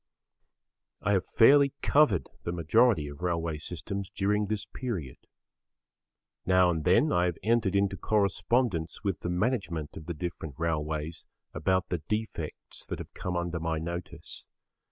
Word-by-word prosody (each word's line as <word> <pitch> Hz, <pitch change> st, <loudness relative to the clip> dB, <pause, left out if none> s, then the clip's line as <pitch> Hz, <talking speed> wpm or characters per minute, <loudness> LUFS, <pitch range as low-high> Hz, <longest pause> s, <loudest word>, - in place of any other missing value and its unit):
I 105 Hz, -, +2 dB
have 95 Hz, -3 st, +1 dB
fairly 140 Hz, +3 st, +6 dB
covered 140 Hz, -, +4 dB
the 85 Hz, -, -3 dB
majority 85 Hz, +2 st, +3 dB
of 70 Hz, +1 st, -9 dB
railway 85 Hz, -3 st, -1 dB
systems 95 Hz, +4 st, -5 dB
during 105 Hz, +1 st, 0 dB
this 105 Hz, 0 st, -2 dB
period. 95 Hz, -, -5 dB, 1.3 s
Now 90 Hz, -1 st, +4 dB
and 80 Hz, -2 st, -2 dB
then 115 Hz, -, +4 dB
I 90 Hz, -, +3 dB
have 90 Hz, -2 st, -1 dB
entered 110 Hz, -3 st, +2 dB
into 100 Hz, -1 st, +2 dB
correspondence 105 Hz, -3 st, 0 dB
with 100 Hz, -4 st, -1 dB
the 85 Hz, -, -4 dB
management 90 Hz, -, -1 dB
of 80 Hz, -, -9 dB
the 85 Hz, -, -3 dB
different 80 Hz, -3 st, -5 dB
railways 80 Hz, -1 st, -2 dB, 0.3 s
about 95 Hz, +4 st, +1 dB
the 90 Hz, -, -1 dB
defects 105 Hz, +8 st, -5 dB
that -, -, -3 dB
have -, -, -9 dB
come 90 Hz, -1 st, -3 dB
under 85 Hz, -1 st, -2 dB
my 80 Hz, 0 st, -1 dB
notice. 85 Hz, +2 st, -6 dB
90 Hz, 145 wpm, -29 LUFS, 80-105 Hz, 1.3 s, fairly